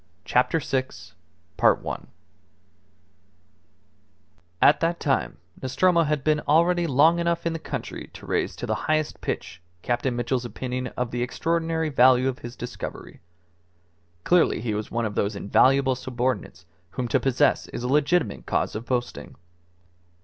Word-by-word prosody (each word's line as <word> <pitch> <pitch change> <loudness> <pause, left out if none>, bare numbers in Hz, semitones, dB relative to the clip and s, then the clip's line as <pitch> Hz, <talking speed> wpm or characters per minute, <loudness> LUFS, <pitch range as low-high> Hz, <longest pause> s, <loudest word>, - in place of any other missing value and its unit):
CHAPTER 125 +6 +2
SIX 130 -3 -4 0.5
At - - +4 3.0
that 170 +1 0
time 140 -3 0 0.2
Nostromo 170 +7 +2
had 150 -2 -1
been 155 -1 +2
already 170 +3 +3
long 160 +5 +4
enough 170 0 -1
in 170 - 0
the 165 - -4
country - - -6
to - - -11
raise - - -1
to - - -5
the - - -1 0.2
highest 155 -1 0
pitch 85 - -5 0.2
Captain 120 +1 -1
Mitchell's 120 +1 -1
opinion 125 +2 -4
of 125 -1 -2
the 120 - -2
extraordinary 160 +4 -1
value 130 -1 +5
of 130 -1 -2
his 120 +1 -8
discovery. 120 - -7 1.0
Clearly 175 -2 +3
he 110 -1 -2
was 105 0 -4
one 115 +1 -1
of 105 - -3
those 100 +1 -1
invaluable 130 +7 +3
subordinates 125 -7 -3 0.2
whom 125 +6 -3
to - - +3
possess 135 -2 +2
is - - -6
a - - -1
legitimate 145 - +1
cause - - 0
of 115 +2 -6
boasting. 125 -1 -3
130 Hz, 140 wpm, -25 LUFS, 120-160 Hz, 3.0 s, value